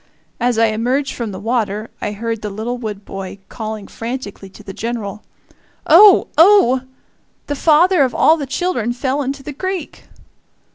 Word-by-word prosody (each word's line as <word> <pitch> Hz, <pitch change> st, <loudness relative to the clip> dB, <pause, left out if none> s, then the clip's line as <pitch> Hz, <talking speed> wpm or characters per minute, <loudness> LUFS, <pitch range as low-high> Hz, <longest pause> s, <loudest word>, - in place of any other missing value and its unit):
As 245 Hz, -1 st, +1 dB
I 230 Hz, -, +4 dB
emerged 245 Hz, +6 st, -1 dB
from 230 Hz, -4 st, -4 dB
the 190 Hz, -, -7 dB
water 215 Hz, -1 st, -2 dB
I 210 Hz, -, -3 dB
heard 225 Hz, +1 st, -4 dB
the 210 Hz, -, -4 dB
little 225 Hz, +5 st, -4 dB
Wood 210 Hz, -3 st, -6 dB
boy 195 Hz, 0 st, -7 dB
calling 215 Hz, -2 st, -6 dB
frantically 225 Hz, -5 st, -7 dB
to -, -, -15 dB
the 195 Hz, -, -8 dB
General: 215 Hz, -2 st, -5 dB, 0.6 s
"Oh! 390 Hz, +5 st, +7 dB
oh! 325 Hz, -9 st, +6 dB, 0.6 s
The 290 Hz, -, -3 dB
father 330 Hz, +4 st, +4 dB
of 260 Hz, -3 st, +1 dB
all 320 Hz, -, +5 dB
the 290 Hz, -4 st, -5 dB
children 260 Hz, -7 st, -1 dB
fell 265 Hz, +3 st, -2 dB
into 275 Hz, 0 st, -4 dB
the 295 Hz, -, -7 dB
creek!" 370 Hz, +2 st, -5 dB
240 Hz, 160 wpm, -18 LUFS, 215-285 Hz, 0.6 s, Oh